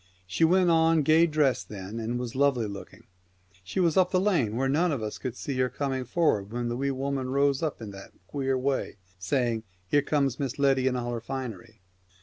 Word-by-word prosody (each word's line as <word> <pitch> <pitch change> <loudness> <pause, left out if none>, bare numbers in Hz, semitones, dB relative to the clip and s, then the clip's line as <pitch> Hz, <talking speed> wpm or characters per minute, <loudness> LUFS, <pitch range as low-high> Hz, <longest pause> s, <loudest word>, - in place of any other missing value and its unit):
She 95 - -1
went 180 +1 +4
on 165 -1 +4
gay 160 +3 +5
dressed 150 -4 +1
then, 105 +2 -6
and 115 +2 -2
was 125 -2 -4
lovely 135 -4 +2
looking. 100 -1 -9 0.6
She 95 - -4
was 170 -2 +2
up 185 -1 +5
the 185 - +2
lane 170 - +1
where 135 +2 +1
none 160 +6 +2
of 130 -7 -2
us 105 - -5
could 125 -3 -4
see 140 - -4
her 130 0 +2
coming 135 -2 -2
forward 115 - +1
when 120 0 -2
the 120 - -2
Wee 140 +2 -1
Woman 135 -1 -2
rose 140 0 +2
up 155 -3 -2
in 105 - -7
that 100 0 -10 0.2
queer 135 -2 -1
way, 130 -4 -1 0.2
saying, 120 +2 0 0.2
" 90 +1 -38
Here 145 - +5
comes 140 -3 0
Miss 135 -3 -3
Letty 135 -2 +3
in 130 - +1
all 120 -1 -2
her 115 - -4
finery." 115 -5 -7
135 Hz, 215 wpm, -27 LUFS, 120-145 Hz, 0.6 s, gay